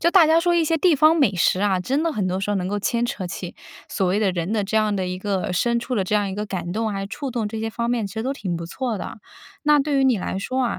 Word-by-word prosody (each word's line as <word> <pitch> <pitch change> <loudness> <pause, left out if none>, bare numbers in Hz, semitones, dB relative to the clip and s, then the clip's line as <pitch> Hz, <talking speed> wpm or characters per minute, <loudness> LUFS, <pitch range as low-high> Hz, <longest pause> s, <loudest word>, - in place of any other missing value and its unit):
就 340 - +3
大 345 -4 +6
家 325 +1 +4
说 350 0 +2
一 335 -1 +3
些 325 +1 +1
地 325 -1 +3
方 310 +3 +6
美 270 -10 +3
食 185 +2 +2
啊， 200 -2 +2
真 270 - 0
的 330 -2 0
很 200 -7 -1
多 185 +1 -1
时 200 - -2
候 205 - +1
能 180 - -2
够 205 +2 -2
牵 235 +4 0
扯 230 -7 -4
起 175 0 -6 0.3
所 195 - -1
谓 195 +3 +1
的 200 -3 +1
人 175 +3 -2
的 210 -3 0
这 215 +2 -2
样 215 -2 +2
的 185 -1 -1
一 180 - -3
个 190 -1 -2
深 235 +7 +1
处 235 +2 -3
的 200 - +1
这 185 - -5
样 205 -1 0
一 190 - -4
个 210 - -3
感 175 -4 -4
动 220 +3 -1
啊， 210 - -3
还 - - -3
有 195 - -4
触 270 +5 -5
动 230 -3 -2
这 220 +1 -5
些 225 0 -2
方 235 +1 -2
面 240 -2 0
其 195 - -12
实 220 +2 -3
都 270 - 0
挺 190 -10 -4
不 170 - -6
错 235 +4 -3
的。 205 - -7 0.4
那 300 -1 +5
对 280 -1 +1
于 - - +3
你 255 -6 +3
来 190 +1 -3
说 255 +5 -2
啊， 235 - -2
215 Hz, 355 characters per minute, -22 LUFS, 190-265 Hz, 0.4 s, 大